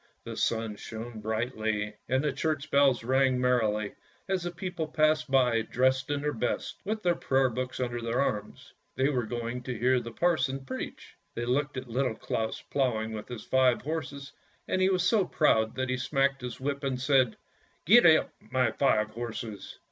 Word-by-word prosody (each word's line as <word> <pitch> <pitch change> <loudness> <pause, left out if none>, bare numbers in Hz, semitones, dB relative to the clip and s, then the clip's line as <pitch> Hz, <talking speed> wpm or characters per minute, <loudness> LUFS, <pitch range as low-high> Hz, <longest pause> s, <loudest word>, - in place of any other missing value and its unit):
The - - -6
sun 110 -2 -1
shone 115 +1 -7
brightly 110 -1 -2 0.2
and 130 +2 +2
the 150 - 0
church 155 -2 -2
bells 135 -5 +4
rang 130 +1 +2
merrily 110 -5 +1 0.3
as 190 -1 0
the 175 - -3
people 175 -2 -4
passed 155 -1 +2
by, 125 -4 +3
dressed 130 +4 +1
in 145 -1 -1
their 150 0 -1
best, 120 +1 -2
with 215 +2 -3
their 175 -1 +3
prayer 135 -5 +1
books 125 +2 -4
under 120 -2 -2
their 115 +2 -1
arms. 105 -6 -3 0.2
They 135 +2 +2
were 125 -6 -1
going 120 +1 -4
to 125 -1 -5
hear 125 +2 +3
the 120 - -7
parson 135 -2 0
preach. 130 - -7 0.2
They 120 - -2
looked 140 +3 0
at 130 0 -5
Little 125 0 -1
Claus 110 0 -3
ploughing 110 -5 0
with 110 -1 -6
his 120 -3 -7
five 130 -2 +3
horses, 140 -2 -4 0.4
and 185 - 0
he 185 - +4
was 185 -2 +2
so 205 +2 +3
proud 110 -10 +2
that 130 -1 -2
he 130 - 0
smacked 135 0 +1
his 125 -1 -6
whip 140 +1 -2
and^said, 130 -3 +2 0.3
" - - -37
Gee 170 -3 +8
up, - - -4
my 130 -1 0
five 110 -6 +2
horses." 115 -2 -6
130 Hz, 185 wpm, -29 LUFS, 115-145 Hz, 0.4 s, Gee